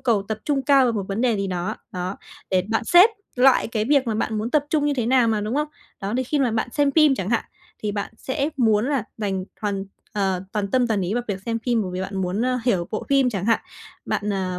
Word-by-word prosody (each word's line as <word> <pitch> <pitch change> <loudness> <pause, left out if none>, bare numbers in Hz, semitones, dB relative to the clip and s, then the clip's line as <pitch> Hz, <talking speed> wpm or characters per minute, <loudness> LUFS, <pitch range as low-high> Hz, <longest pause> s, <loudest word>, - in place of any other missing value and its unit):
cầu 230 -6 +2
tập 220 -1 -2
trung 280 -3 0
cao 275 0 +5
vào 240 - +2
một 210 -3 -2
vấn 200 +2 -2
đề 240 -3 +2
gì 195 - -1
đó. 180 +3 -3 0.2
Đó, 180 +1 -3 0.3
để 185 -1 +3
bạn 225 0 +1
xếp 360 - +7 0.3
loại 255 -1 +5
cái 220 -2 -1
việc 275 +1 +3
mà 225 - 0
bạn 220 0 -1
muốn 220 +3 -2
tập 290 +1 +2
trung 300 -2 +2
như 290 - +1
thế 245 -4 -1
nào 250 -1 +4
mà, 220 -2 +1
đúng 215 +3 -3
không? 300 +1 0 0.3
Đó, 200 +2 -3
đôi 255 +1 0
khi 295 +4 -1
mà 260 -4 +2
bạn 225 +1 -1
xem 290 -1 +2
phim 305 -3 +5
chẳng 195 -5 -3
hạn, 235 - +1 0.4
thì 210 -1 -1
bạn 200 +1 -4
sẽ 280 +2 -1
muốn 220 -2 +3
là 275 -7 0
dành 195 -4 -2 0.2
hoàn 200 -2 -2 0.3
ờ, 190 -3 0
toàn 205 -2 -1
tâm 250 +1 +3
toàn 220 -3 0
ý 185 +3 -1
vào 245 - 0
việc 195 -2 -2
xem 230 0 -1
phim 235 -3 +2
bởi 185 - -4
vì 180 - -3
bạn 195 +1 -4
muốn, 185 +4 -1
ơ, 255 0 +1
hiểu 190 -9 +1
bộ 215 - -3
phim 275 -2 +3
chẳng 195 -3 -3
hạn, 230 -1 +3 0.4
bạn, 205 0 -1
à, 185 -2 -2
225 Hz, 265 wpm, -23 LUFS, 200-260 Hz, 0.4 s, xếp